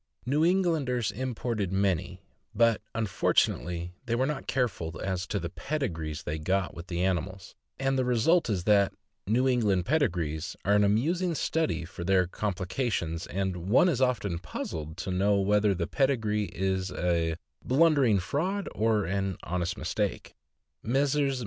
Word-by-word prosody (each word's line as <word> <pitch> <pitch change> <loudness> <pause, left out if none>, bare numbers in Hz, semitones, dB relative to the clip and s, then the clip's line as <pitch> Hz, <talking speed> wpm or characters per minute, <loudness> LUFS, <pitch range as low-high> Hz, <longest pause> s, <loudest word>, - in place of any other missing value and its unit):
New 145 +5 +2
Englanders 160 - +1
imported 115 -5 -2
many, 95 -2 0 0.4
but, 115 0 +3
unfortunately, 90 -5 0
they 115 - +1
were 130 +2 +2
not 140 -1 -3
careful 90 -11 -1
as 95 -2 -2
to 100 - -1
the 85 -1 -5
pedigrees 85 - -3
they 75 +1 -3
got 95 +4 0
with 85 +1 -9
the 90 0 -2
animals, 95 +1 -2 0.2
and 135 0 0
the - - +2
result 125 +6 +3
is 95 -5 0
that 100 -1 +3 0.3
"New 125 +5 +2
England 105 -8 +2
pedigrees" 90 - 0
are 100 - +3
an 105 0 +5
amusing 165 - +1
study 90 - 0
for 90 0 -8
their 95 0 +3
complications, 90 -2 -2
and 95 -1 -3
one 125 - +5
is 135 -8 +1
often 110 -9 +1
puzzled 80 -1 -6
to 95 +2 -4
know 100 +2 +2
whether 105 0 +3
the 85 -1 -1
pedigree 110 - +1
is 95 -1 -2
a 85 -2 0 0.3
blundering 140 -6 +4
fraud 175 - -1
or 110 -2 +1
an 95 0 -1
honest 90 0 -2
mistake. - - -2 0.5
Messrs. 135 +2 +1
100 Hz, 150 wpm, -28 LUFS, 90-130 Hz, 0.5 s, an